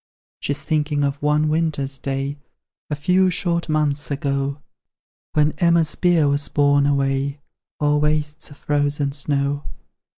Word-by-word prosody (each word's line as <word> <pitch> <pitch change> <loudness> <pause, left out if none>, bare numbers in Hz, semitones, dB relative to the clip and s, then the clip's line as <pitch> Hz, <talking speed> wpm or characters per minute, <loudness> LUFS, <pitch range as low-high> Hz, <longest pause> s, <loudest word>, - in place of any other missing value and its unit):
She's 140 0 -3
thinking 150 -2 0
of 140 0 -1
one 150 +1 +2
winter's 150 -4 -1
day, 135 +1 -3 0.5
A 150 - -1
few 185 +5 +3
short 170 -2 -1
months 150 -2 0
ago, 140 0 -2 0.8
Then 150 0 +3
Emma's 170 -3 +3
bier 175 -4 +3
was 140 0 0
borne 145 -1 +3
away 140 0 0 0.4
O'er 150 0 +2
wastes 150 +1 -1
of 145 - -14
frozen 145 -1 0
snow. 140 0 -1
145 Hz, 130 wpm, -21 LUFS, 140-155 Hz, 0.8 s, few